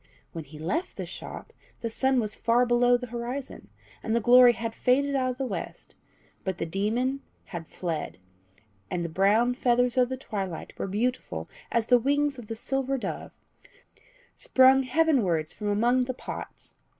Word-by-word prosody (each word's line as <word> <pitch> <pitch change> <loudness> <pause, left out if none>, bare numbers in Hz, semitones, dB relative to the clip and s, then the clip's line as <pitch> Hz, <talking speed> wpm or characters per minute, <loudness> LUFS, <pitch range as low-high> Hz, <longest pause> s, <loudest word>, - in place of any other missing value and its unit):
When 165 -2 -6
he 150 +2 -12
left 265 - -3
the - - -4
shop, - - -9 0.3
the 230 - -2
sun 265 +2 +2
was 215 -2 -2
far 240 +2 +2
below 245 0 +4
the 250 - -6
horizon, 245 +3 -5 0.3
and 220 - -1
the - - +3
glory 245 +2 +7
had 230 -1 -4
faded 280 +4 +2
out 260 -1 +1
of 250 - -4
the 270 - -2
west; - - -6 0.5
but 190 -2 -3
the - - -2
demon 225 +10 -1 0.2
had 165 -3 -7
fled, 165 -4 -4 0.7
and 175 +4 -2
the - - -3
brown 210 +8 +3
feathers 245 0 +2
of 250 -1 +4
the 260 - -3
twilight 195 -9 -5
were - - -2
beautiful 235 +6 -2 0.2
as 235 -2 +1
the 245 +1 +5
wings 285 +2 +1
of 230 - -10
the 225 - -4
silver 270 +3 -2
dove, - - -5 1.1
sprung 265 - +5
heavenwards 255 - +1
from 210 - -5
among 240 +5 +2
the 255 0 -4
pots. - - -8
245 Hz, 170 wpm, -27 LUFS, 210-260 Hz, 1.1 s, glory